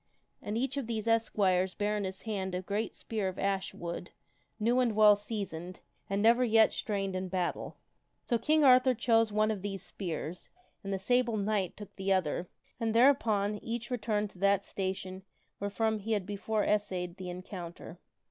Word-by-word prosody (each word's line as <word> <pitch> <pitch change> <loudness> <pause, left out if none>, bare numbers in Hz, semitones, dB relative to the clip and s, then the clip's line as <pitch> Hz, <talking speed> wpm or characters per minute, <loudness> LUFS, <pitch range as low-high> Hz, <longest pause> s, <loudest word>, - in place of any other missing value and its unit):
And 210 +2 -3
each 265 +3 -1
of 270 -5 -2
these 220 -2 -3
es 230 0 +2
quires 185 -2 +2
bare 210 0 0
in 205 -1 -1
his 190 0 -5
hand 190 -4 -3
a 180 - -3
great 205 +4 -2
spear 215 -4 -3
of 185 - -4
ash 195 -1 -1
wood, 170 +1 -6 0.5
new 235 +4 +2
and 240 -4 +2
well 210 -1 +7
seasoned, 195 -5 -5 0.3
and 200 +1 0
never 235 +3 +5
yet 225 -2 +5
strained 195 -5 -2
in 185 0 -2
battle. 180 -1 -3 0.5
So 235 -3 +1
King 305 +6 +3
Arthur 255 -1 +6
chose 225 -1 +3
one 215 +1 +2
of 205 -3 -4
these 195 -1 -4
spears 170 -2 -5 0.3
and 195 - -4
the 195 - 0
Sable 240 +3 +1
Knight 200 -3 -1
took 210 -1 -10
the 195 0 -1
other, 180 -1 -1 0.3
and 225 -1 -1
thereupon 220 -5 +3
each 235 +1 -4
returned 215 -4 -1
to 180 - -17
that 200 0 +3
station 190 -1 -4 0.4
wherefrom 220 +2 0
he 220 +2 -2
had 205 -3 0
before 205 +2 -1
essayed 185 -4 -1
the 185 -2 -6
encounter. 175 -1 -8
205 Hz, 180 wpm, -31 LUFS, 190-225 Hz, 0.5 s, well